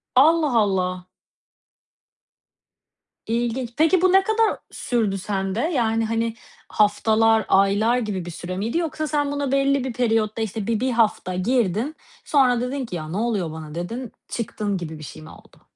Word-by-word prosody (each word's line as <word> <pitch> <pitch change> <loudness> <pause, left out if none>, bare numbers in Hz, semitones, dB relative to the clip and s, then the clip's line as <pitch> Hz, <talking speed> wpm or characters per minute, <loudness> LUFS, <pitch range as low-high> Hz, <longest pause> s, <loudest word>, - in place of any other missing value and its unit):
Allah 305 0 +5
Allah. 185 -2 -1 2.2
İlginç. 235 +1 -1
Peki, 325 +3 +4
bu 370 -1 +4
ne 385 0 +5
kadar 440 +1 +1
sürdü 220 -5 -1
sende? 195 +1 -2
Yani, 230 -8 +1
hani, 230 0 -1 0.4
haftalar, 220 +1 +3
aylar 205 +5 +3
gibi 205 -7 -3
bir 175 - -6
süre 175 +2 -6
miydi 225 - -1
yoksa 310 -2 -2
sen 290 -1 0
buna 285 -2 -2
belli 275 -1 +2
bir 260 -3 -3
periyotta, 225 -2 0
işte, 215 -1 -3
bir 225 -2 0
1 260 0 0
hafta 215 -5 +1
girdin, 230 - 0 0.3
sonra 250 -4 +3
dedin 260 +1 -3
ki, 180 - -6
”Ya, 155 -2 -5
ne 185 - -3
oluyor 210 -8 -1
bana?” 155 -1 -8
dedin, 230 +8 -5 0.2
çıktın 210 -3 -3
gibi 160 -3 -6
bir 155 - -9
şey 150 - -9
mi 155 - -12
oldu? - - -17
225 Hz, 160 wpm, -23 LUFS, 195-260 Hz, 2.2 s, Allah